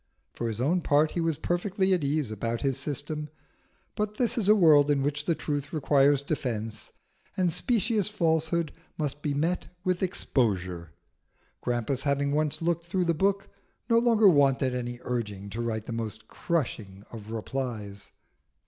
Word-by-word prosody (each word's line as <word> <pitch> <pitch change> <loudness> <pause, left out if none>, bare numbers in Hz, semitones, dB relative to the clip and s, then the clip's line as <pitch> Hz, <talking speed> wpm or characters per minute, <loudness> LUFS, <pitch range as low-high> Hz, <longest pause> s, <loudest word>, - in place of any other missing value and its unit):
For 120 - -3
his 110 -1 -4
own 165 +8 +2
part 150 0 +3
he 170 - -2
was 165 -3 0
perfectly 190 +3 0
at 175 -5 +1
ease 140 -4 0
about 115 +2 -2
his 135 -2 +1
system; 150 +1 -4 0.7
but 210 0 -2
this 245 -3 +1
is 210 -4 0
a 215 - +8
world 150 -7 +6
in 140 -2 +2
which 145 +1 -1
the 170 - +1
truth 145 -2 -3
requires 140 -2 +3
defence, 115 -7 -3 0.5
and 180 -3 +2
specious 220 - +1
falsehood 160 -4 0 0.3
must 145 -1 -2
be 145 -2 -1
met 165 +5 0 0.2
with 185 -1 0
exposure. 95 - -1 0.7
Grampus 125 +2 -1
having 140 0 +1
once 150 +2 0
looked 170 0 0
through 180 +1 0
the 170 - +2
book, 195 +4 0 0.4
no 230 - +6
longer 230 -3 +5
wanted 135 -5 +4
any 120 -1 -4
urging 105 -5 -4
to 115 +4 -3
write 110 -2 -2
the 120 - -5
most 110 -1 -5
crushing 110 - -3
of 110 -2 -9
replies. 110 -4 -4
145 Hz, 160 wpm, -28 LUFS, 120-170 Hz, 0.7 s, a